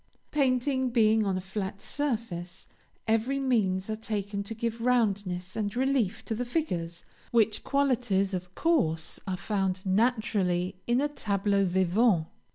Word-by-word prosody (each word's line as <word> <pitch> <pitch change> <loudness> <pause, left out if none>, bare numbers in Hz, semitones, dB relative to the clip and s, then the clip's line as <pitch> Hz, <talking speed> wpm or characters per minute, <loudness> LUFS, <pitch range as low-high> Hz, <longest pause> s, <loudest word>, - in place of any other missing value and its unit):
Painting 260 -1 +1
being 220 -2 +4
on 190 -1 0
a - - -3
flat 190 +1 -4
surface, 215 -11 -4 0.4
every 225 +5 +1
means 205 -8 +1
are 220 - -2
taken 205 -2 -3
to 200 +3 -5
give 230 +1 -3
roundness 205 -7 0
and 210 -1 -2
relief 260 -6 0
to - - -2
the 235 +3 -2
figures, 175 - -3 0.2
which 220 -2 +2
qualities 245 -9 +1
of 180 0 -5
course 165 - +1
are 185 -1 -1
found 190 -2 -1
naturally 190 -4 +1
in 240 +1 +3
a 290 - +2
tableau 200 -7 0
vivant. 185 0 +3
215 Hz, 140 wpm, -28 LUFS, 190-245 Hz, 0.4 s, being